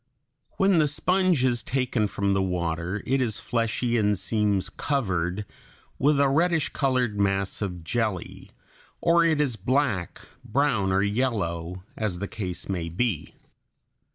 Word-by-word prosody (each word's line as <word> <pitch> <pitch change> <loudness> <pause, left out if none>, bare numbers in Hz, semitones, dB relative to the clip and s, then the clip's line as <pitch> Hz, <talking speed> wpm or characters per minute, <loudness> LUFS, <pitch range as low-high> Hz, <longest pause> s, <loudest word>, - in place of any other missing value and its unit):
When 195 -3 +4
the 150 - +4
sponge 180 -1 +2
is 120 -2 +1
taken 125 -4 0
from 100 0 0
the 95 - +2
water 90 +1 -2
it 135 +1 +1
is 115 -4 -1
fleshy 115 0 0
and 105 -1 +2
seems 105 -2 0
covered 95 - -1 0.5
with 145 +1 +3
a 140 - +5
reddish 160 +2 +2
colored 125 -6 0
mass 100 0 0
of 90 -4 -4
jelly, 110 -1 -3 0.5
or 170 0 +4
it 160 -3 +2
is 135 -7 +1
black, 115 -4 0 0.2
brown, 115 -6 +1
or 95 +1 +2
yellow, 95 -6 -1
as 105 -5 -2
the 100 +3 -4
case 90 -6 -5
may 85 -4 -2
be. 90 -4 -2
110 Hz, 140 wpm, -26 LUFS, 95-135 Hz, 0.5 s, a